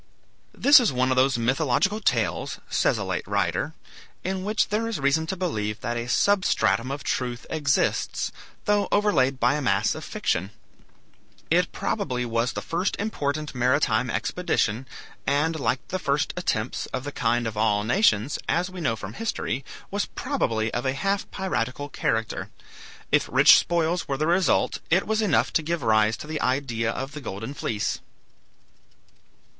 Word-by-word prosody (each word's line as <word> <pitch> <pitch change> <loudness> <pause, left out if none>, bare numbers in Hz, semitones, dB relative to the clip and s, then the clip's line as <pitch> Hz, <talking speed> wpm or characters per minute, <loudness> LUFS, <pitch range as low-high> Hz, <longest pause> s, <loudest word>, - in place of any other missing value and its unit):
This 285 +1 +7
is 240 - +2
one 130 0 +1
of - - +2
those 130 0 +3
mythological 135 - +1
tales, 215 - 0
says - - +1
a - - -2
late - - -3
writer, - - -1 0.5
in 190 0 -2
which 210 +2 +1
there 215 +2 0
is 230 -8 -3
reason 140 +4 +1
to 190 - -2
believe 105 - -2
that 120 -1 -2
a 120 0 -3
substratum 185 -9 +2
of 140 +1 -4
truth 125 -1 -2
exists, 145 -3 0 0.3
though 205 -1 +2
overlaid 140 -11 +2
by - - +3
a 150 - -1
mass 105 -5 +2
of - - -7
fiction. 95 +4 -1 1.0
It - - +3
probably 125 -1 -2
was 115 +1 0
the - - -4
first 175 +4 -1
important 150 -8 -2
maritime 125 -2 +2
expedition, 130 -10 -1 0.4
and 155 +3 +1
like 135 -1 -1
the 185 - -2
first 140 -3 0
attempts 125 -10 -2
of 130 - -4
the 145 - -5
kind 120 -2 0
of 110 -1 -3
all 105 -1 +2
nations, 120 - +2
as 180 +2 +1
we 185 -1 -7
know 115 -8 +1
from 105 -1 -8
history, 140 - -3 0.3
was 205 +1 0
probably 115 - -1
of 120 - -1
a 130 - 0
half 195 +8 -1
piratical 145 - -3
character. 115 -4 -2 0.6
If - - +2
rich - - +8
spoils 170 +1 0
were 135 - -1
the 155 - 0
result 175 +3 +2
it 180 +4 +3
was 220 0 0
enough 200 -8 +2
to - - +3
give 165 -1 -2
rise 110 -1 +3
to - - -8
the 155 0 -4
idea 125 -4 0
of 135 +4 -5
the 150 0 -8
golden 110 +2 -6
fleece. 105 -6 -2
140 Hz, 165 wpm, -25 LUFS, 120-180 Hz, 1.0 s, rich